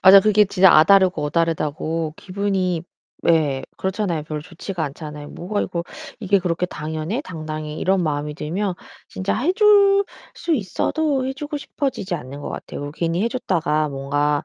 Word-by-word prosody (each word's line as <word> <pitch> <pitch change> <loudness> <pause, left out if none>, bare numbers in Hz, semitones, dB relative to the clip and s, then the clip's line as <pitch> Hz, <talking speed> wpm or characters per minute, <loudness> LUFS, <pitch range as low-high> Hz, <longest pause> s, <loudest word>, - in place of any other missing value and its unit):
맞아. 195 +1 +10
그게 210 +1 +5
진짜 190 -1 +5
'아' 155 - +8
다르고 190 -5 +4
'어' 150 - -2
다르다고 160 -1 -1
기분이 190 -3 -1 0.4
예, 150 -5 +2
그렇잖아요. 190 -4 -1
별로 155 -1 -4
좋지가 175 0 -5
않잖아요. 150 0 -7
'뭐가 205 +4 -2
이거 170 -2 -3 0.4
이게 200 -1 +3
그렇게 180 -1 -1
당연해? 160 - -4
당당해?' 155 -2 -5
이런 190 0 +2
마음이 150 -1 -2
들면 180 +6 -2 0.3
진짜 190 +1 -2
해 285 +11 +1
줄 400 -1 +5 0.3
수 340 - -2
있어도 270 - 0
해 265 - -1
주고 295 +2 -5
싶어지지 270 - -3
않는 140 -2 -7
것 - - -5
같아요. - - -6
이거 145 - -5
괜히 170 +3 -1
해 230 - +2
줬다가 165 -10 0
뭔가 145 +1 0
175 Hz, 355 characters per minute, -22 LUFS, 155-205 Hz, 0.4 s, 맞아